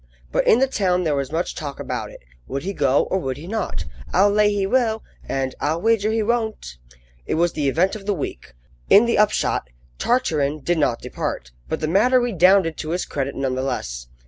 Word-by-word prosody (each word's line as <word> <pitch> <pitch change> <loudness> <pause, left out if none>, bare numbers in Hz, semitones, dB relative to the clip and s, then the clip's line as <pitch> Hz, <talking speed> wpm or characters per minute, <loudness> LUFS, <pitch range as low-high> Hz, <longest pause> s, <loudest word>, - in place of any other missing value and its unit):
But - - +1
in - - +6
the 265 - +4
town 185 -8 0
there 155 -3 +1
was 140 -1 -2
much 165 +2 -1
talk 145 -3 -6
about - - -4
it. - - -13 0.3
Would 140 - -4
he 195 - -3
go 140 -4 +2
or 190 - +2
would 130 -6 -3
he 150 - -9
not? 190 - -3 0.3
"I'll 205 - +4
lay 210 0 +3
he 200 -1 0
will!" 225 0 +1 0.3
and 135 -1 -1
"I'll 155 +3 0
wager 220 +1 +2
he 220 0 +1
won't!" 220 - -2 0.5
It - - 0
was 170 +1 +2
the 145 -3 0
event 180 +9 +1
of 205 -2 -9
the 205 - +1
week. 65 - -6 0.3
In 210 +4 +7
the 235 -3 +1
upshot, 205 - +1 0.3
Tartarin 155 - +1
did 175 +3 0
not 120 -6 +1
depart, - - -4 0.2
but - - -2
the 155 - 0
matter 230 +10 +4
redounded 190 -7 +3
to 155 - -5
his 175 +2 -1
credit 140 -1 -3
none 135 -1 -1
the 130 - -2
less. 60 - -4
175 Hz, 210 wpm, -22 LUFS, 140-210 Hz, 0.5 s, In